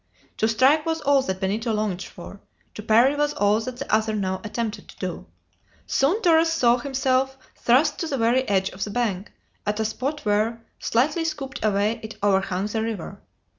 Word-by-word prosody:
To 220 - +2
strike 265 +7 +4
was 325 0 -1
all 280 -1 +4
that 190 -8 -3
Benito 215 +5 -1
longed 210 -4 -1
for; 195 +2 -10 0.3
to - - -7
parry 235 +6 +4
was 295 0 0
all 205 +1 +3
that 245 +2 -6
the 275 -2 -5
other 220 0 +2
now 190 -2 -2
attempted 225 0 -4
to - - -15
do. - - -5 0.6
Soon 340 +12 +1
Torres 325 -1 +4
saw 245 -7 +3
himself 265 0 0 0.2
thrust 280 +6 +2
to 330 - -2
the 275 - -2
very 235 +2 +3
edge 190 -1 +2
of 190 - -5
the - - -4
bank, 205 -4 -2 0.3
at 210 +1 -2
a 220 - +1
spot 270 +7 -3
where, 220 +2 0
slightly 295 +8 +1
scooped 290 -7 -4
away, 210 +2 +1
it 220 0 -8
overhung 195 -1 +1
the 220 +1 -2
river. 220 -6 -5
230 Hz, 185 wpm, -24 LUFS, 210-270 Hz, 0.6 s, strike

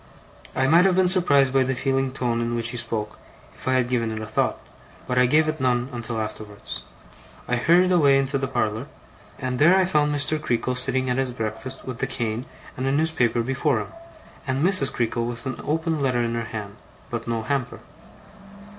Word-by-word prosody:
I 130 - +2
might 165 +6 +5
have 190 -2 +3
been 185 -1 +4
surprised 145 -8 +4
by 135 - +4
the 130 0 0
feeling 135 0 0
tone 120 -3 -1
in 120 0 -1
which 115 0 0
he 120 - -4
spoke, 110 -2 -3 0.3
if - - -12
I 130 - +3
had 130 -2 +2
given 120 -2 0
it 110 0 -4
a 110 - -5
thought; 110 - -1 0.5
but 125 0 +1
I 125 - +5
gave 155 +4 +3
it 155 -2 -2
none 125 0 +1
until 120 -1 -3
afterwards. 105 -1 -6 0.7
I 125 - +1
hurried 175 +9 +4
away 140 -6 +4
to 140 +1 -1
the 135 - -1
parlour; 110 -1 -1 0.5
and 130 -2 -3
there 170 +6 +6
I 190 - +4
found 150 -4 +2
Mr. 145 +2 0
Creakle, 125 -2 -1
sitting 130 +1 +2
at 125 +1 0
his 135 -1 0
breakfast 120 +2 -5
with 125 -2 -6
the - - -1
cane 115 0 -3 0.3
and 130 +1 -2
a - - +2
newspaper 135 -6 +1
before 135 +1 0
him, - - -6 0.6
and 135 +4 +1
Mrs. 185 -8 +2
Creakle 120 0 -1
with 120 -1 -5
an 130 - -4
opened 160 +1 -1
letter 125 -3 +1
in 115 0 -1
her 115 -1 -2
hand. 110 -1 -7 0.3
But 120 -1 -4
no 115 -1 -1
hamper. 135 +1 -2
130 Hz, 205 wpm, -24 LUFS, 115-140 Hz, 0.7 s, there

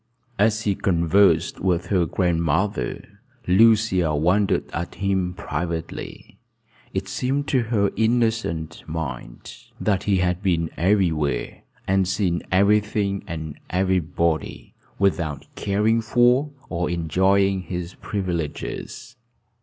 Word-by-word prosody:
As 110 +1 +2
he 100 - +1
conversed 95 +2 +2
with 90 -1 0
her 90 -4 +2
grandmother, 85 - -1 0.3
Lucia 95 -5 +4
wondered 90 +7 +2
at 85 +2 -4
him 95 -2 -1
privately. 85 +1 -5 0.5
It 95 0 -3
seemed 135 +7 -1
to 130 - +3
her 100 -4 +2
innocent 110 -7 0
mind 65 -7 -6 0.3
that 100 -3 0
he 100 -2 +2
had 90 0 0
been 85 -5 0
everywhere, 80 -8 0 0.3
and 95 -1 +2
seen 90 -2 0
every 100 +3 +5
thing 100 -2 -2
and 80 -3 -6
everybody, 90 -3 -1 0.2
without 85 -7 0
caring 105 +3 +1
for 120 +5 +3 0.2
or 90 0 -2
enjoying 95 +3 +2
his 90 -1 -5
privileges. 95 - -5
95 Hz, 105 wpm, -23 LUFS, 85-105 Hz, 0.5 s, every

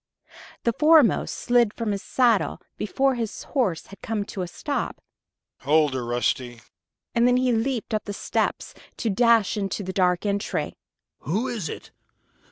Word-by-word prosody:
The 235 - +2
foremost 305 -1 +4
slid 240 -3 +2
from 230 -3 -2
his 200 -1 -2
saddle 235 -6 +2 0.2
before 265 +6 +1
his 230 -3 -4
horse 230 - -1
had 200 - -14
come 220 -2 -2
to 195 - -6
a 180 - -3
stop. - - -3 0.6
"Hold 150 0 +3
her, 130 -2 -2
Rusty!" 120 0 -1 0.5
And 235 +1 +4
then 250 0 +4
he 255 0 +2
leaped 230 0 -1
up 215 - -1
the 205 - -4
steps, - - -2 0.2
to 225 - -1
dash 230 -1 +3
into 200 0 -2
the 185 0 -5
dark 180 0 +2
entry. 200 0 -2 0.4
"Who 210 - -1
is 210 -10 -3
it? - - -8
210 Hz, 160 wpm, -24 LUFS, 185-240 Hz, 0.6 s, foremost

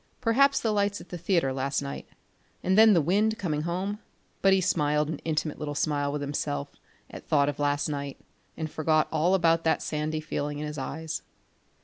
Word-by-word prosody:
Perhaps 265 +4 +3
the 225 - +1
lights 205 -1 0
at - - -13
the 175 - -5
theatre 170 -6 +1
last 135 +1 -1
night, 140 -1 -6 0.6
and 190 - +2
then 220 0 +8
the 170 - +4
wind 210 +8 +2
coming 155 -8 -1
home 185 +5 -2 0.4
but 195 - +5
he 190 - +5
smiled 150 -4 +1
an 160 - -4
intimate 155 -1 -2
little 145 -1 -4
smile 145 -1 0
with 145 0 -3
himself 140 - -3 0.4
at - - -10
thought 140 -2 +3
of 145 0 -3
last 145 0 +1
night 140 -2 -4 0.4
and 155 -1 -4
forgot 155 0 +2
all 175 +5 +3
about 165 -2 +3
that 160 - +2
sandy 155 0 -2
feeling 145 -1 -3
in 150 - -4
his 150 -1 -5
eyes. 155 +3 -4
155 Hz, 195 wpm, -27 LUFS, 145-185 Hz, 0.6 s, then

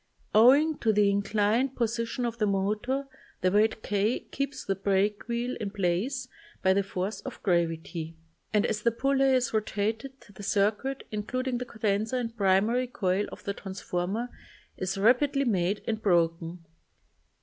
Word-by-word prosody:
Owing 280 +8 +6
to 225 - +2
the 205 -1 +4
inclined 210 +6 +1
position 230 +1 -1
of 235 0 -3
the 210 - +2
motor 215 +8 -1 0.3
the 185 - +2
weight 215 +2 +2
k 210 +3 0
keeps 275 0 -3
the 195 - +1
break 200 +2 0
wheel 240 +1 -2
in 210 - -3
place 205 +7 -1 0.4
by 190 - +5
the 200 - +3
force 195 +1 -4
of 265 - -8
gravity 165 -2 -1 0.4
and 210 -1 +3
as 210 - -1
the 235 - +3
pulley 270 +3 +2
is 250 -2 0
rotated 220 +4 -1
the 205 0 -14
circuit, 210 +7 0
including 245 +4 -2
the 250 - -4
condenser 220 +1 -1
and 235 -2 -3
primary 215 +5 +2
coil 205 -6 0
of - - -10
the 200 - -2
transformer, 190 +4 -3 0.5
is 185 +1 -3
rapidly 270 +7 +3
made 195 -3 0
and 220 -1 -1
broken. 170 -2 +1
215 Hz, 150 wpm, -28 LUFS, 195-245 Hz, 0.5 s, Owing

